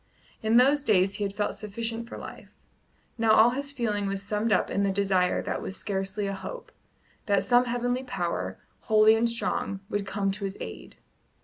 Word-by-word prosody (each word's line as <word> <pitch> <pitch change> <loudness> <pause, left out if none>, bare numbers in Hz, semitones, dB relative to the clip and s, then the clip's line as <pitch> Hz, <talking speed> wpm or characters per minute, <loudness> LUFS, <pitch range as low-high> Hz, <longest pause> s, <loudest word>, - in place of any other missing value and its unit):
In 220 +1 +3
those 275 +3 +5
days 195 -5 +3
he 210 - -2
had 200 0 -3
felt 205 - -1
sufficient 230 +2 -5
for - - -7
life; - - -10 0.6
now 225 -1 +4
all 225 +2 +6
his 280 +2 -3
feeling 215 -7 -1
was 195 0 -3
summed 210 +2 -1
up - - +2
in 200 - 0
the 200 - +2
desire 190 -2 +1
that - - -3
was 190 - -5
scarcely 195 +1 -2
a 195 - -2
hope, 475 - -8 0.6
that 200 -2 +3
some 245 +5 +4
heavenly 245 +1 -1
power, 170 - -3 0.2
holy 215 0 +5
and 230 +1 +2
strong, 230 -4 -2
would 205 -1 -2
come 195 0 -1
to 200 +1 -6
his 195 0 -5
aid. - - -8
210 Hz, 190 wpm, -27 LUFS, 195-235 Hz, 0.6 s, all